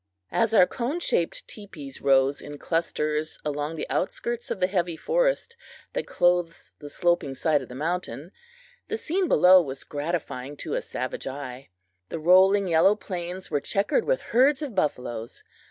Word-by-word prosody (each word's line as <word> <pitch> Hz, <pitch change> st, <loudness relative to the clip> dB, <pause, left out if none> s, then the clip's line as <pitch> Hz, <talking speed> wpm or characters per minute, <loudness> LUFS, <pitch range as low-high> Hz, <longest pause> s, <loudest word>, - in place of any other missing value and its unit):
As 230 Hz, -1 st, +2 dB
our 185 Hz, -, +8 dB
cone 255 Hz, -, -3 dB
shaped 170 Hz, -, -1 dB
teepees 170 Hz, -10 st, -9 dB
rose 135 Hz, 0 st, +3 dB
in 145 Hz, 0 st, -8 dB
clusters 155 Hz, -1 st, -1 dB
along 150 Hz, +1 st, -2 dB
the 155 Hz, -, -4 dB
outskirts 235 Hz, +5 st, -2 dB
of 205 Hz, -, -3 dB
the 185 Hz, -, +3 dB
heavy 175 Hz, -3 st, -1 dB
forest -, -, 0 dB, 0.4 s
that -, -, -3 dB
clothes 175 Hz, -1 st, +1 dB
the 145 Hz, -, -9 dB
sloping 175 Hz, -4 st, 0 dB
side 150 Hz, 0 st, +2 dB
of 130 Hz, -, -10 dB
the 125 Hz, -, -9 dB
mountain, 165 Hz, +2 st, -3 dB, 0.6 s
the 440 Hz, -, -2 dB
scene 370 Hz, -1 st, -1 dB
below 180 Hz, -, +7 dB
was 135 Hz, -4 st, -5 dB
gratifying 145 Hz, -3 st, -4 dB
to -, -, -5 dB
a -, -, 0 dB
savage 130 Hz, +1 st, -5 dB
eye. 135 Hz, -1 st, -7 dB, 0.4 s
The -, -, -4 dB
rolling 190 Hz, +4 st, +5 dB
yellow 175 Hz, +4 st, +4 dB
plains 180 Hz, -2 st, -6 dB
were 145 Hz, -2 st, +1 dB
checkered 200 Hz, -, 0 dB
with -, -, +1 dB
herds 270 Hz, +5 st, +4 dB
of 275 Hz, -6 st, -5 dB
buffaloes. 125 Hz, -, -3 dB
170 Hz, 160 wpm, -26 LUFS, 145-200 Hz, 0.6 s, our